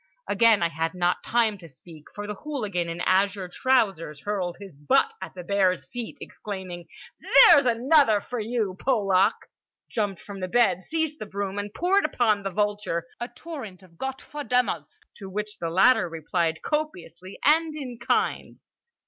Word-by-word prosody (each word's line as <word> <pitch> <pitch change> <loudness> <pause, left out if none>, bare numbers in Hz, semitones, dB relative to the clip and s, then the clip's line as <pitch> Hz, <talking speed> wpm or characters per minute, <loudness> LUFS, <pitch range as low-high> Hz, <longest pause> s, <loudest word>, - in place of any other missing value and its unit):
Again 215 -2 +4
I 170 - +2
had 165 +2 -3
not 175 0 0
time 225 -4 +1
to 165 -2 -12
speak; 155 +3 -15
for 205 0 -5
the 210 - -4
hooligan 205 - -3
in 170 +1 -5
azure 190 +1 +1
trousers 190 - 0
hurled 190 -4 -3
his 195 -6 -11
butt 150 - +2
at - - -8
the 180 - -7
bear's 185 -1 +1
feet, 240 -2 -7
exclaiming: 185 -4 -7 0.6
"There's 285 -6 +7
another 240 -1 +4
for 245 +4 -6
you, 215 -3 -2
Polak!"—jumped 205 -2 -1
from 200 -1 -9
the 185 - -3
bed, 185 -3 +2
seized 315 - -2
the 215 - -6
broom, 200 0 -4
and 205 0 -5
poured 370 - +2
upon 220 -8 +1
the 195 - -3
vulture 205 -3 -1
a 240 - -3
torrent 250 - -9
of 170 -3 -21
Gott 265 0 -4
ver 295 0 -7
dummers, 230 - -1 0.2
to 195 -2 -8
which 210 +2 -5
the 165 - -2
latter 190 +1 +4
replied 160 0 -2
copiously 185 - -4
and 315 +1 +3
in 255 -6 -7
kind. 240 - -1
205 Hz, 165 wpm, -25 LUFS, 180-245 Hz, 0.6 s, There's